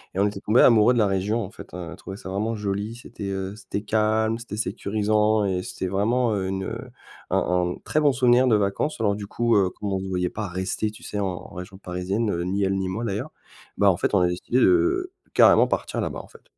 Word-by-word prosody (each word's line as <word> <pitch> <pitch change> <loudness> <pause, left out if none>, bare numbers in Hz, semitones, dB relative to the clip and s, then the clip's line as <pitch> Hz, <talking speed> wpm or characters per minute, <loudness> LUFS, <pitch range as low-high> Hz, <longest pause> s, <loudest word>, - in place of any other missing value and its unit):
Et - - -1
on 100 - +4
était 100 -1 -5
tombé 110 +4 +3
amoureux 115 +1 +6
de - - 0
la 110 - +4
région, 100 +4 0
en 95 - -11
fait, - - -11
on 90 -2 -6
a - - -8
trouvé 95 - -9
ça 95 - -9
vraiment 110 +4 -1
joli, 105 +2 -3
c'était, 115 -4 -7
heu, 95 +1 -4
c'était 105 -2 -5
calme, 110 +1 +1
c'était 115 -3 -7
sécurisant 105 0 +1
et 95 -2 0
c'était 95 - -5
vraiment 110 +4 +1
une, 95 0 -2
heu, - - -4 0.5
un - - +1
un 90 0 0
très 155 - +1
bon 145 -2 +4
souvenir 125 0 +4
de 115 - +4
vacances. 105 +8 0
Alors 100 -2 +1
du 100 -1 -7
coup, 115 +2 +1 0.2
comme 100 -2 -2
on 95 - 0
se 95 - -5
voyait 90 -1 -1
pas 105 +1 -4
rester 95 +4 -2
tu 105 - -13
sais, 105 - -4
en 95 -2 -4
région 90 +1 -8
parisienne, 90 +1 -2
ni 100 +2 0
elle 95 0 +1
ni 95 -1 -2
moi, 100 +5 -3
d'ailleurs, 105 -3 -3 0.5
bah, 100 -1 +5
en 90 - -2
fait, 100 - 0
on 95 - +4
a 90 - +4
décidé 90 +8 -1
de, - - +5
heu, 360 +1 +2 0.2
carrément - - +6
partir - - -2
là-bas, - - -3
en - - -11
fait. - - -18
105 Hz, 240 wpm, -24 LUFS, 95-110 Hz, 0.5 s, amoureux